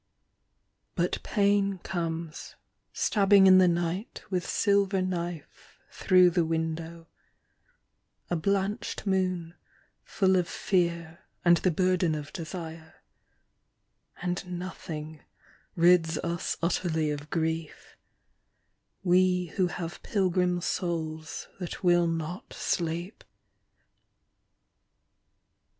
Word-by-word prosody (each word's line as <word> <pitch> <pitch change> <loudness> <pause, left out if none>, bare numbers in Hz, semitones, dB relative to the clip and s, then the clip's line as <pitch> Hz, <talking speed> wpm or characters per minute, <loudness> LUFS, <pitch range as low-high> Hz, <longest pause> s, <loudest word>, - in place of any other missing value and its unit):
But - - 0
pain 200 -2 +1
comes 165 -3 -5 0.4
stabbing 200 -2 +4
in 185 0 +8
the 185 - +6
night 175 +4 -2
with 180 -1 0
silver 200 -2 +2
knife 175 -4 -5
through 185 -1 +4
the 170 0 +2
window, 165 +1 -3 1.2
A 175 - -1
blanched 200 +6 -1
moon 185 -3 0 0.5
full 190 -2 +2
of 180 -2 +1
fear 170 -3 -1 0.3
and 175 0 +6
the 185 - +1
burden 180 -1 +1
of 150 -1 -7
desire 160 -1 -8 0.5
— - - -28
And 180 0 -3
nothing 160 -4 -7 0.5
rids 170 -2 +4
us 170 0 -2
utterly 160 -3 0
of 145 0 -6
grief, 160 -1 -3 1.1
We 180 -1 +2
who 185 -2 +2
have 175 -1 -6
pilgrim 180 -3 +1
souls 160 -3 -3
that 180 0 -6
will 175 -1 +4
not 165 +2 -4
sleep. 170 +3 -3
175 Hz, 95 wpm, -28 LUFS, 165-185 Hz, 1.2 s, in